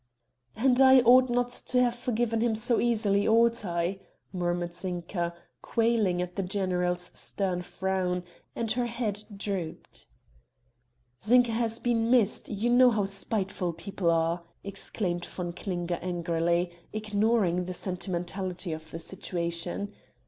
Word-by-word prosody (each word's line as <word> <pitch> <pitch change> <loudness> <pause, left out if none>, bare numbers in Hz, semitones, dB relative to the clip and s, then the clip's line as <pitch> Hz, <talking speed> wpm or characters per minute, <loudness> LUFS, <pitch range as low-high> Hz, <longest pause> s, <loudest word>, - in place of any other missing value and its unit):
"And 255 +2 +3
I 265 -1 +8
ought 250 +2 +6
not 245 0 +1
to 250 +1 +1
have 245 -1 +3
forgiven 240 -2 -1
him 230 -2 +2
so 235 +2 +2
easily 210 -4 +2
ought 230 0 +4
I?" 175 +1 -2 0.3
murmured 175 -1 -2
Zinka, 175 -1 -3 0.3
quailing 225 -6 +1
at 180 0 -8
the 195 - -1
general's 180 -2 -1
stern 185 -3 -2
frown, 180 -1 -2 0.3
and 230 -2 -1
her 245 -1 0
head 225 -3 -2
drooped. 195 -5 -5 1.1
"Zinka 240 +3 +4
has 225 0 0
been 235 -1 0
missed, 240 -5 +3
you 220 +4 0
know 250 +1 +7
how 210 -4 +1
spiteful 195 -3 -2
people 185 +1 -2
are!" 165 +1 +1 0.2
exclaimed 195 -2 -2
von 175 -2 -5
Klinger 175 -1 -3
angrily, 170 0 0 0.2
ignoring 210 -4 +1
the 185 - -4
sentimentality 180 -1 -3
of 160 0 -8
the 165 - -6
situation. 175 +2 -3
195 Hz, 130 wpm, -28 LUFS, 175-230 Hz, 1.1 s, I